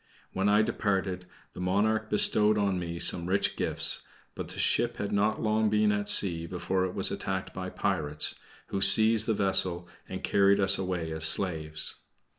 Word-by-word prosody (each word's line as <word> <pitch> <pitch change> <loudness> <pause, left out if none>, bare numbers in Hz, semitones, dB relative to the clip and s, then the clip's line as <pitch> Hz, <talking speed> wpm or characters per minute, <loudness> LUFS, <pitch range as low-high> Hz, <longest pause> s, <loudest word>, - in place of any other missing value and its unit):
When 95 +2 0
I 105 +1 +3
departed, 95 -4 -3 0.3
the - - -11
monarch 110 +4 -1
bestowed 105 0 +2
on 100 -3 -1
me 85 -1 -6
some 85 0 0
rich 95 +2 0
gifts; - - 0 0.3
but - - -7
the - - -8
ship - - 0
had 100 - -4
not 105 +2 -1
long 110 0 +1
been 105 0 +1
at 105 0 -2
sea, 85 -4 +3
before 95 +1 -2
it 90 - -6
was 95 - +1
attacked 95 -1 -5
by 95 -1 -6
pirates, 75 -7 -2 0.4
who 100 - -4
seized 110 +1 +6
the 110 - 0
vessel, 95 -3 0 0.2
and - - -7
carried 100 0 +2
us 95 -1 +2
away 90 -4 -4
as 80 0 0
slaves. 80 -3 +1
95 Hz, 175 wpm, -27 LUFS, 90-105 Hz, 0.4 s, seized